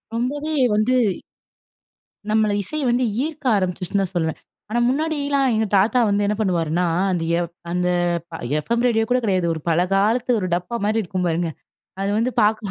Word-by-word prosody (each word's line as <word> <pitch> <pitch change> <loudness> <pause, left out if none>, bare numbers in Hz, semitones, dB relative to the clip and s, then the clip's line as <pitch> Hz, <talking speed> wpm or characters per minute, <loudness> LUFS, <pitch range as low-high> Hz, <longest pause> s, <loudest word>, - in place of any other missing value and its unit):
ரொம்பவே 290 +6 -2 0.2
வந்து, 215 +5 +2 1.3
நம்மள 215 0 +2
இசை 305 +11 -4
வந்து 245 +2 +2 0.2
ஈர்க்க 305 -2 -6
ஆரம்பிச்சுருச்சுன்னு 185 +1 -1
தான் 190 0 -5
சொல்லுவேன். 160 -2 -1 0.3
ஆனா, 235 +2 0
முன்னாடில்லாம் 285 -1 0
எங்க 220 0 +1
தாத்தா 220 +6 +3
வந்து 205 0 +1
என்ன 210 +1 0
பண்ணுவாருன்னா, 175 -4 0 0.3
அந்த 175 -3 -1 0.2
எஃப் 170 -1 -4 0.2
அந்த 180 0 0 0.7
எஃப் 155 - -5
எம் 235 +1 +1
ரேடியோ 225 -2 +2
கூட 250 +1 +3
கெடையாது. 185 -5 +1
ஒரு 160 - -6
பல 165 +1 +3
காலத்து 225 +6 +2
ஒரு 185 - -2
டப்பா 180 +7 -2
மாரி 220 +1 +1
இருக்கும் 185 0 -3
பாருங்க! 170 0 0 0.5
அது 200 - 0
வந்து 235 +3 +1
பார்க்க 215 0 +2
210 Hz, 165 wpm, -21 LUFS, 180-245 Hz, 1.3 s, தாத்தா